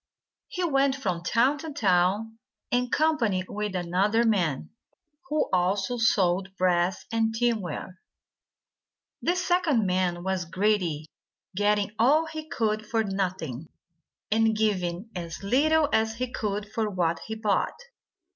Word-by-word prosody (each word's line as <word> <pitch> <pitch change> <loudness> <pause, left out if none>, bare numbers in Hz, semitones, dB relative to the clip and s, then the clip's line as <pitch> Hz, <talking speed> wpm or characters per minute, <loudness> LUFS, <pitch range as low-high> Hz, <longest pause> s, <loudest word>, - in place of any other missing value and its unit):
He 365 - -4
went 275 -4 +2
from 185 -11 -2
town 250 +10 +2
to 320 0 -6
town, 205 0 +1 0.3
in 245 0 +1
company 240 -13 +1
with 210 -1 -4
another 185 +6 +1
man, 175 - 0 0.6
who 305 +1 +1
also 190 +5 +1
sold 195 -4 +1
brass 180 0 +1
and 225 -1 +1
tinware. 205 -6 -2 1.2
This 360 +1 0
second 320 - +2
man 180 -2 0
was 190 -1 -1
greedy, 185 -4 0 0.5
getting 205 0 +1
all 290 +8 +4
he 315 -1 -7
could 215 -2 -1
for 225 +1 0
nothing, 185 - -3 0.6
and 220 0 +3
giving 195 -1 -1
as 170 0 -6
little 300 +8 +3
as 220 0 +2
he 250 +1 -3
could 205 -1 -2
for 220 -1 -1
what 170 -4 0
he 220 - -4
bought. 220 - 0
210 Hz, 125 wpm, -26 LUFS, 185-235 Hz, 1.2 s, all